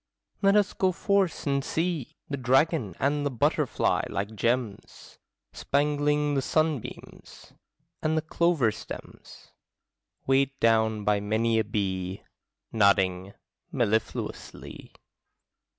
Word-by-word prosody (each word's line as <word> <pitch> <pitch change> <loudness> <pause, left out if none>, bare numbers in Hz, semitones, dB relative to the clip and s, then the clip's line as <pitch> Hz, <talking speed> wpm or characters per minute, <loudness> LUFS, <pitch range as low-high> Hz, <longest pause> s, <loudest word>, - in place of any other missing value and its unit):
Let 195 0 +4
us 205 -2 +3
go 190 -1 +1
forth 195 0 0
and 140 -1 0
see 165 -5 -2
The 140 - -3
dragon 130 - +1
and 145 +1 +1
the 145 - 0
butterfly, 125 -4 +1
like 100 +2 -3
gems, 115 0 -3 0.3
Spangling 145 +1 +1
the 135 - +1
sunbeams; 155 -2 -3 0.5
and 155 +1 0
the 155 - 0
clover 160 -7 +2
stems, 110 - -11 0.7
Weighed 135 +1 +1
down 110 -2 +2
by 105 0 +2
many 110 +2 +1
a - - +2
bee, 95 -3 -3 0.5
Nodding 95 -2 +2 0.4
mellifluously. 110 - -3
130 Hz, 105 wpm, -27 LUFS, 110-150 Hz, 0.7 s, Let